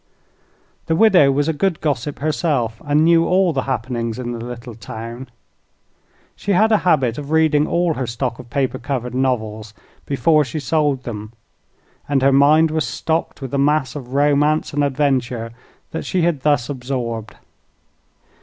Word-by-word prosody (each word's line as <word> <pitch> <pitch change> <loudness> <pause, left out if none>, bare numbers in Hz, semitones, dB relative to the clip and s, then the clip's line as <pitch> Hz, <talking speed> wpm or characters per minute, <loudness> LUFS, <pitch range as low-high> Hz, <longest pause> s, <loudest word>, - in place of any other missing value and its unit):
The 160 - +1
widow 180 -8 +5
was 145 +2 0
a 160 - +1
good 180 +2 0
gossip 145 -2 -2
herself, 135 -6 -1
and 145 +1 +2
knew 165 0 +4
all 185 -2 +3
the 135 - 0
happenings 115 -2 -2
in 125 -1 -4
the 115 -1 -5
little 120 0 -8
town. 115 +3 -8 1.1
She 200 - -2
had 220 +5 +3
a 215 - +4
habit 135 -9 +1
of 145 -1 -8
reading 155 -1 +3
all 170 -1 +1
her 130 -4 -3
stock 120 +1 -3
of 120 - -11
paper 130 -1 -1
covered 125 -2 -4
novels 110 -5 -2 0.3
before 150 +3 +3
she 135 +3 -5
sold 145 -1 0
them, 110 -2 -7 0.8
and 135 -2 +1
her 135 0 +4
mind 150 +3 +5
was 155 -5 -1
stocked 160 +1 -2
with 130 - -6
the 140 - -1
mass 145 -1 +1
of 130 -2 -7
romance 145 +2 +2
and 145 0 +1
adventure 130 -5 0 0.5
she 180 -2 -1
had 165 -5 0
thus 145 -5 +2
absorbed. 125 -5 -4
140 Hz, 160 wpm, -20 LUFS, 120-155 Hz, 1.1 s, widow